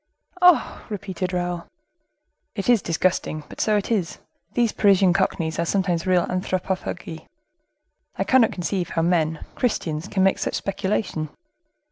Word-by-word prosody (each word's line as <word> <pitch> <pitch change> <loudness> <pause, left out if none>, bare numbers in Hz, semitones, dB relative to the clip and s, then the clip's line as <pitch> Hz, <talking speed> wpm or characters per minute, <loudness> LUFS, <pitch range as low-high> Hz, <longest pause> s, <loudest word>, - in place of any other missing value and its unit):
"Oh!" 360 -2 +4
repeated 190 -3 -4
Raoul. 175 -1 -2 0.9
"It 200 +2 -2
is 235 -4 +5
disgusting, 165 -2 0
but - - -6
so 215 -1 +3
it 205 - -3
is. 185 -8 0 0.4
These 235 -3 +3
Parisian 195 -3 +4
cockneys 170 -4 0
are 170 - +1
sometimes 180 -2 0
real 180 -2 +3
anthropophagi. 185 -2 -3 0.9
I - - 0
cannot 255 -4 +4
conceive 180 -1 -2
how 165 - 0
men, 160 -2 +1
Christians, 170 - -1
can 190 -2 +1
make 195 - +3
such - - -2
speculation. 195 -5 -2
185 Hz, 135 wpm, -23 LUFS, 170-200 Hz, 0.9 s, is